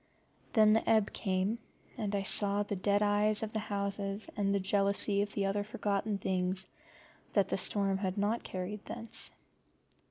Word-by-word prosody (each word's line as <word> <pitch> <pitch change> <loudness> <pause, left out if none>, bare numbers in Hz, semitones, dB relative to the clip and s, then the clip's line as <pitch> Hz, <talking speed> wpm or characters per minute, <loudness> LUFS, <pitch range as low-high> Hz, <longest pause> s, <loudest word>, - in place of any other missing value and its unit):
Then 215 -2 +5
the 225 - 0
ebb 220 -2 +2
came, 195 +3 -2 0.4
and 205 -2 -3
I 200 - -1
saw 205 +1 +5
the 205 - -4
dead 200 +2 +1
eyes 210 +1 +1
of 220 - -5
the 220 - -1
houses 200 0 0
and 200 -1 0
the 200 - +1
jealousy 200 +1 +3
of 205 0 -3
the 200 - 0
other 200 +1 -1
forgotten 205 0 -2
things 185 0 0 0.7
that 200 -2 +2
the - - -1
storm 195 0 +1
had 190 0 -3
not 210 +3 0
carried 190 +3 -6
thence. 230 - -3
200 Hz, 165 wpm, -31 LUFS, 195-210 Hz, 0.7 s, Then